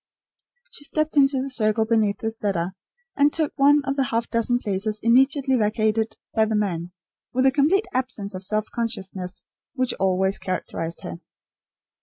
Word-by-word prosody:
She 390 - -11
stepped 310 +1 -1
into 275 -2 +4
the 275 - -4
circle 220 -2 +2
beneath 220 -3 +2
the 225 - -3
cedar, 195 -5 -2 0.4
and 290 +1 +4
took 310 -2 -1
one 290 +1 +5
of 275 +1 -2
the 270 - +2
half 235 -2 -1
dozen 230 +1 +1
places 210 -1 -2
immediately 265 +3 +3
vacated 220 0 0 0.2
by 220 -1 +3
the 220 0 -1
men, 175 -5 -1 0.4
with 255 +1 +2
the 265 - +6
complete 315 +9 +3
absence 250 -6 -3
of 185 0 -6
self 215 +2 0
consciousness 195 -6 -4 0.3
which 255 -2 +1
always 190 +1 +1
characterised 170 -2 -4
her. 85 - -7
225 Hz, 160 wpm, -24 LUFS, 200-270 Hz, 0.4 s, the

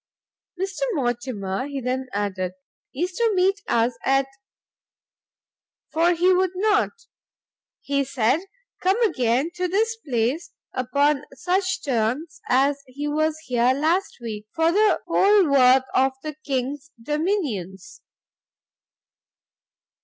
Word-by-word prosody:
"Mr 390 +5 -3
Mortimer," 240 - -2
he 280 -1 -4
then 260 +1 -2
added, 190 -3 -2 0.4
"is 350 +7 -2
to 460 +3 +1
meet 385 +2 +2
us 235 +1 +1
at 270 0 +3 1.7
for 335 +2 +3
he 360 +2 +4
would 370 0 +1
not, 420 +2 +2 0.9
he 280 0 0
said, 260 +1 +1 0.4
come 380 +5 +2
again 255 - +1
to 365 0 -1
this 440 +5 +1
place, 265 - -2 0.2
upon 280 +3 +1
such 375 +4 -1
terms 260 +5 -1
as 275 +2 +3
he 285 +3 -5
was 310 +1 0
here 250 +1 +2
last 330 +7 0
week, 215 -3 -6
for 325 +1 +3
the 420 +3 +3
whole 400 -2 +4
worth 260 -2 +5
of 265 0 +3
the 305 -1 -4
king's 275 +2 -3
dominions." 295 - -3
285 Hz, 115 wpm, -23 LUFS, 250-360 Hz, 1.7 s, worth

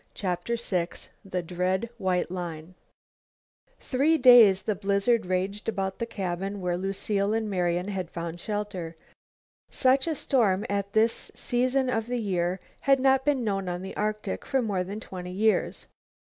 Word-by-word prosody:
CHAPTER 190 +5 -2
VI 185 -7 -1 0.4
THE 185 -2 -3
DREAD 185 +6 -1
WHITE 180 -2 0
LINE 170 -2 -6 1.1
Three 290 +5 +2
days 240 -8 +7
the 215 - 0
blizzard 200 +2 +1
raged 190 +4 -1
about 190 -2 -3
the 230 - -2
cabin 195 -1 -3
where 180 -2 -1
Lucile 195 +2 -1
and 225 -1 -1
Marian 180 -1 0
had 185 -4 -3
found 170 0 -5
shelter. 205 -5 -4 0.7
Such 265 +3 +2
a 320 - 0
storm 210 -9 +1
at 200 0 -2
this 225 +1 +2
season 255 +2 +1
of 225 -3 -1
the 245 0 -1
year 185 -3 -1 0.3
had 275 -1 +6
not 265 0 +3
been 280 -3 +1
known 195 -4 -1
on 175 +1 -4
the 190 - -7
Arctic 215 0 -2
for 270 - 0
more 195 -5 -1
than 200 +4 -6
twenty 180 -4 -7
years. 215 +3 +1
200 Hz, 155 wpm, -27 LUFS, 180-230 Hz, 1.1 s, days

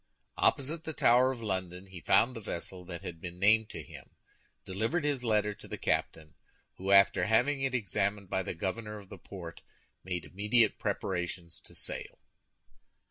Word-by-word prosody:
Opposite 155 +4 +1
the 160 - -4
Tower 125 -1 +5
of 120 -3 -6
London 95 -2 -3
he 95 -2 -10
found 120 +8 +4
the - - -4
vessel 95 -3 -5
that 85 +1 -7
had 85 -3 -7
been 90 -1 -6
named 110 +3 +5
to - - -7
him, - - -13 0.5
delivered 110 - 0
his 145 -4 0
letter 105 -2 +2
to - - -13
the - - -5
captain, 80 -2 -1 0.4
who 95 +1 -4
after 100 -2 +6
having 135 +6 +3
it 135 -1 0
examined 100 -2 0
by 95 - 0
the 90 - -4
governor 105 +5 -3
of 100 -2 -12
the - - -10
port 85 -4 -9 0.4
made 90 -1 -3
immediate 105 +3 +2
preparations 90 -4 -3
to - - -14
sail. - - -5
100 Hz, 170 wpm, -31 LUFS, 90-115 Hz, 0.5 s, after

